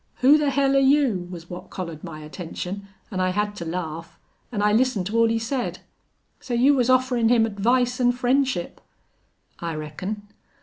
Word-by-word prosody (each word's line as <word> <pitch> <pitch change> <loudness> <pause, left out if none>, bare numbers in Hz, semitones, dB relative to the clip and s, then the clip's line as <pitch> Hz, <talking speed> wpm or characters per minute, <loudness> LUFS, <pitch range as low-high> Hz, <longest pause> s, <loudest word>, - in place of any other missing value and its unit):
'Who 270 +4 +7
the 295 -1 +2
hell 275 0 +2
are - - +6
you?' 265 -10 +3
was 170 -2 -9
what 175 0 -9
collared 165 -4 -6
my 160 -3 -8
attention, 180 +5 -6 0.2
an' 185 - -3
I 185 0 +2
had 205 +2 -1
to 170 - -5
laugh. 165 -1 -5 0.3
An' 205 -3 -1
I 210 0 +3
listened 225 -5 +2
to 215 +4 -2
all 230 - +5
he 225 0 +1
said. 245 +3 -2 0.6
So 245 - -4
you 260 +4 +5
was 255 -3 +2
offerin' 255 -3 +3
him 235 -2 +4
advice 245 +4 +1
an' 245 0 +5
friendship?" 250 -6 0 0.8
"I 165 -2 -4
reckon." 180 +8 -5
220 Hz, 180 wpm, -24 LUFS, 180-255 Hz, 0.8 s, Who